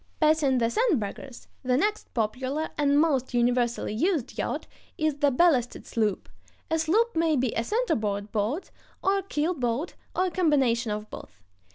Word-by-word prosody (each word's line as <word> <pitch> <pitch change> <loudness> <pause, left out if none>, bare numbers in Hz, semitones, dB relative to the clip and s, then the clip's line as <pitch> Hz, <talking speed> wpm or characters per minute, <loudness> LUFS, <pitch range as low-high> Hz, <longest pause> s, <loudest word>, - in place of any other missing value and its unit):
] - - -38
Passing 305 -4 +3
the 230 -1 +1
sandbaggers, 270 - -1 0.2
the 255 -1 +1
next 420 +8 -1
popular 260 +7 -1
and 290 -1 +3
most 270 -6 +1
universally 240 -2 +1
used 315 - 0
yacht - - -3 0.3
is 310 -2 0
the 290 -1 +4
ballasted 255 -4 +2
sloop. 215 -4 -1 0.4
A 320 - +2
sloop 420 +9 +2
may 325 -1 +2
be 255 -3 0
a 230 - 0
center 465 - 0
board 205 -1 -2
boat, 225 - -2 0.3
or 390 +1 +3
a - - -6
keel 335 -2 -1
boat, 255 +2 -2 0.2
or 370 - +2
a 370 - -2
combination 270 - +2
of 210 0 -4
both. 90 0 -11
275 Hz, 170 wpm, -27 LUFS, 235-325 Hz, 0.4 s, the